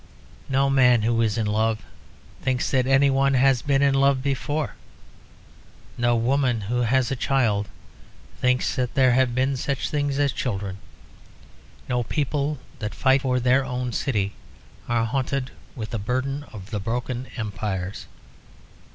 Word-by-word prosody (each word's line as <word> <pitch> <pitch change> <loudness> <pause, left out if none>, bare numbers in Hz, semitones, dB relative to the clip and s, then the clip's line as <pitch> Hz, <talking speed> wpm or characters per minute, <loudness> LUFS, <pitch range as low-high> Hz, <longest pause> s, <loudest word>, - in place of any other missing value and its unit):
No 135 +1 +2
man 125 -4 +4
who 115 +1 +2
is 110 -2 +1
in 110 - 0
love 110 +1 0 0.6
thinks 130 -1 0
that 130 -2 +2
any 135 +1 +4
one 135 0 +2
has 130 -1 +4
been 140 -1 +2
in 140 -1 +4
love 135 -1 +3
before. 145 +2 -1 1.2
No 120 0 +2
woman 125 0 +1
who 110 +5 -2
has 125 +2 +2
a - - 0
child 110 -7 +1 0.7
thinks 125 0 +1
that 125 -1 -1
there 130 -2 +5
have 125 -1 +2
been 135 +2 +1
such 135 +1 -2
things 145 -2 0
as 140 -2 +2
children. 100 -5 -3 1.1
No 125 -1 0
people 145 +3 -1 0.2
that 105 -3 -4
fight 130 0 +3
for 130 -2 +1
their 125 +2 +3
own 125 -1 -3
city 105 -8 -1 0.6
are 115 -1 +2
haunted 130 +2 -2 0.2
with 110 -3 -6
the 115 - -2
burden 130 +6 -2
of 100 0 -10
the 105 - -2
broken 120 +4 -3
empires. 100 -4 -4
125 Hz, 150 wpm, -24 LUFS, 115-135 Hz, 1.2 s, there